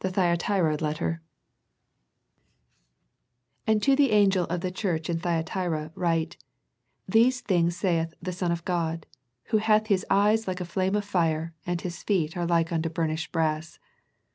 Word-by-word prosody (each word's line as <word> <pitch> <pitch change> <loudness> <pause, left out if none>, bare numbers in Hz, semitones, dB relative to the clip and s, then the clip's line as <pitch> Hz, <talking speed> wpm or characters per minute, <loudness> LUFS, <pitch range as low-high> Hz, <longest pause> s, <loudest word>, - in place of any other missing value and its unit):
THE 190 - +1
THYATIRA 175 -2 +1
LETTER 160 +2 -2 2.5
"And 220 -1 +2
to 275 -1 +5
the 280 -1 +4
angel 200 -4 +4
of 175 +1 -3
the 185 - -2
church 175 -4 -2
in 165 - -1
Thyatira 165 -2 -2
write; 170 -2 -1 0.4
" - - -53 0.3
These 240 +5 +3
things 175 -5 +1
saith 165 -4 0
the 185 +1 -4
Son 175 -1 -1
of 170 0 -3
God, 165 -3 -1 0.4
Who 220 - +3
hath 215 0 +3
His 185 - 0
eyes 210 +2 +3
like 185 0 -2
a 180 - -3
flame 190 +2 0
of 205 -1 -1
fire, 165 -4 0
and 175 -1 -1
His 175 -2 -6
feet 175 -5 0
are 175 -1 -1
like 170 -1 +1
unto 165 -1 0
burnished 160 0 -2
brass. 160 -1 -1
175 Hz, 160 wpm, -27 LUFS, 165-195 Hz, 2.5 s, to